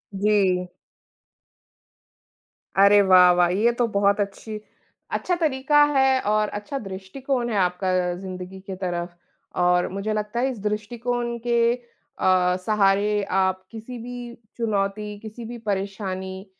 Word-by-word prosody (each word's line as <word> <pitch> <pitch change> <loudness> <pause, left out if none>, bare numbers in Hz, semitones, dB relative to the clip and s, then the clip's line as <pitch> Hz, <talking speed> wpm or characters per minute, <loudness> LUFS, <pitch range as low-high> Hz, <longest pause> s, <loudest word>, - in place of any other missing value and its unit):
जी। 190 -3 +2 2.1
अरे 200 +1 +6
वाह, 185 -2 +7
वाह! 175 0 +3
ये 235 - +5
तो 240 - +3
बहुत 200 +1 +3
अच्छी 210 +2 -4 0.5
अच्छा 360 - 0
तरीका 295 0 +3
है 265 0 +4
और 215 0 +2
अच्छा 275 +7 -5
दृष्टिकोण 240 +7 -3
है 220 - -2
आपका 185 0 +1 0.2
ज़िंदगी 185 0 -8
के 190 0 -7
तरफ़ 175 -2 -4 0.5
और 180 0 +3
मुझे 200 +3 -3
लगता 210 +2 -2
है, 265 +2 +1
इस 235 - -8
दृष्टिकोण 235 +3 -2
के 235 0 +3 0.5
अ, 180 -1 +3
सहारे 205 0 +2
आप 190 -1 +1
किसी 230 +2 -8
भी 245 -1 -7 0.2
चुनौती, 210 -2 -2
किसी 220 +2 -9
भी 240 +1 -7
परेशानी 190 -1 -4
205 Hz, 125 wpm, -24 LUFS, 190-235 Hz, 2.1 s, वाह